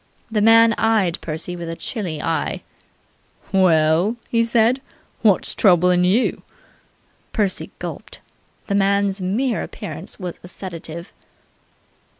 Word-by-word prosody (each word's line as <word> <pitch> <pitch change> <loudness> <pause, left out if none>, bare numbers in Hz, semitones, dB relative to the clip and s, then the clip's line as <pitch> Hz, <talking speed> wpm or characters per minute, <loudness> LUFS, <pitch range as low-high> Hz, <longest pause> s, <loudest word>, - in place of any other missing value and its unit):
This 215 -2 +1
man 225 +1 +6
eyed 210 -6 +1
Percy 165 +2 -5
with 170 -1 -6
a 165 - -4
chilly 175 -7 -4
eye. 165 -1 -2 0.9
"Well," 175 +1 +3
he 230 -1 +2
said. 230 +3 +2 0.4
"What's 205 -4 +3
troublin' 180 -2 +4
you?" 210 +8 +1 0.9
Percy 205 -4 -1
gulped. - - -7 0.5
The 200 - -3
man's 200 0 +1
mere 230 +8 0
appearance - - -7
was 180 -3 -6
a - - -9
sedative. 170 -1 -8
190 Hz, 115 wpm, -21 LUFS, 175-220 Hz, 0.9 s, man